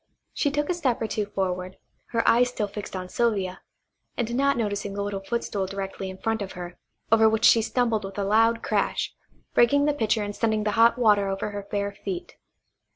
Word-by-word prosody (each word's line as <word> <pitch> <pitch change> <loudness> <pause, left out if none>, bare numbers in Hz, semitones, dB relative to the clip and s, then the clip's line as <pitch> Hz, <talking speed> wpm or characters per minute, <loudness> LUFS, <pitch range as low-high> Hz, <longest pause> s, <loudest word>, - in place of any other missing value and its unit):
She 290 - +1
took 295 +1 -1
a - - +1
step 275 -9 0
or 225 - -1
two 215 -1 -2
forward, 185 -2 -3 0.3
her 230 -1 -1
eyes 245 +1 +5
still 215 -4 -2
fixed 205 -1 -7
on 185 -1 -4
Sylvia, 195 -3 -1 0.6
and 235 -1 -1
not 275 +2 +2
noticing 205 -3 -2
the 200 - -2
little 200 -1 -3
footstool 200 -3 -2
directly 195 0 -5
in 190 - -8
front 225 +1 -1
of 195 - -5
her, 175 -1 -8 0.3
over 220 -1 +6
which 220 0 +1
she 230 - +7
stumbled 230 -2 0
with 195 0 -7
a 200 - 0
loud 225 +3 +3
crash, - - 0 0.4
breaking 285 +4 +4
the 295 - +2
pitcher 220 -5 0
and 205 0 -5
sending 220 -2 +1
the 210 - 0
hot 230 +3 +4
water 205 -4 +3
over 195 +2 -3
her 205 -1 -6
bare 200 0 -1
feet. 355 - -6
215 Hz, 205 wpm, -25 LUFS, 200-235 Hz, 0.6 s, she